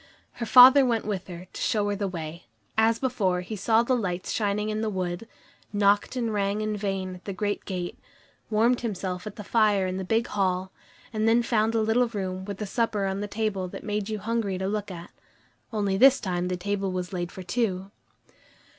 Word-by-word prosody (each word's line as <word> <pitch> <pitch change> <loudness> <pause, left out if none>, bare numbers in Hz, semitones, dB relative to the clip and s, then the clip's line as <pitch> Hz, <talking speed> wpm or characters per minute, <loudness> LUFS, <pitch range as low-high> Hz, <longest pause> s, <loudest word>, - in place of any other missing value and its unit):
Her 235 - -5
father 255 +4 +9
went 235 -3 +1
with 200 -3 -3
her, 175 -1 -8
to - - -6
show 210 -2 +1
her 205 - 0
the 200 0 -2
way. 165 -6 -7 0.3
As 225 +1 +3
before, 210 -9 0
he 200 +5 -6
saw 220 +3 +3
the 255 +2 +2
lights 185 -6 -2
shining 210 0 0
through 215 0 -2
the 220 - 0
wood, 185 +1 -3 0.4
knocked 205 +3 +2
and 230 -3 -1
rang 200 +1 0
in 215 0 -1
vain 195 -2 -3
at 180 - -13
the 200 - -4
great 205 +1 -2
gate, 180 -2 -4 0.5
warmed 230 +3 +3
himself 190 -4 -3
at 210 - -7
the 210 - -7
fire 210 -2 +3
in 185 0 -2
the 190 - -3
big 225 +5 +1
hall, 190 -3 -1 0.4
and 215 0 +1
then 230 +1 +4
found 225 -2 +2
the 225 - +2
little 235 +3 +3
room 190 -4 -4
with 200 -1 -5
the 210 - -4
supper 210 -1 0
on 195 0 -2
the 205 - -3
table 205 -3 -2
that - - -8
made 210 0 -2
you 215 - -2
hungry 210 -2 -1
to 190 +1 -2
look 210 0 -2
at. 175 -2 -9 0.6
Only 200 -3 0
this 270 +4 +7
time 180 -2 -2
the 180 0 -2
table 195 +1 -2
was 185 +1 -4
laid 175 -1 -3
for 185 - -8
two. 190 -1 -1
205 Hz, 210 wpm, -26 LUFS, 185-220 Hz, 0.6 s, father